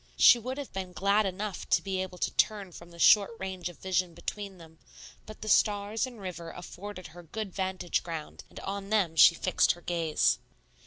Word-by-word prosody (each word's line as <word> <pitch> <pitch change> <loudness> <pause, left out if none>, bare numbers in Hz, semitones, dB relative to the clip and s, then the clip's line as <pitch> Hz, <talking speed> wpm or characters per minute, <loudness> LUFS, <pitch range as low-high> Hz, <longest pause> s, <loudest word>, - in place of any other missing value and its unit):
She 240 - +8
would 255 +4 -5
have 285 -2 -7
been 190 -1 -5
glad 200 +3 +2
enough 195 +1 -5
to - - +4
be 190 -1 -2
able 185 -1 -6
to - - -1
turn 205 -4 0
from 170 0 -12
the 170 - -15
short 200 +3 +6
range 185 -2 -4
of 175 - -13
vision 185 -2 -1
between 195 +3 -6
them; 160 -2 -15 0.5
but 215 - -11
the 215 - -6
stars 210 +3 +2
and 245 -3 -11
river 175 -3 -6
afforded 185 +2 -9
her 175 +2 -12
good 195 +3 -6
vantage 190 -2 -1
ground, 165 -3 -7
and - - -10
on 195 0 -5
them 195 -7 +1
she 170 +1 +8
fixed - - +2
her 175 - -15
gaze. 160 - +1
190 Hz, 200 wpm, -29 LUFS, 175-205 Hz, 0.5 s, She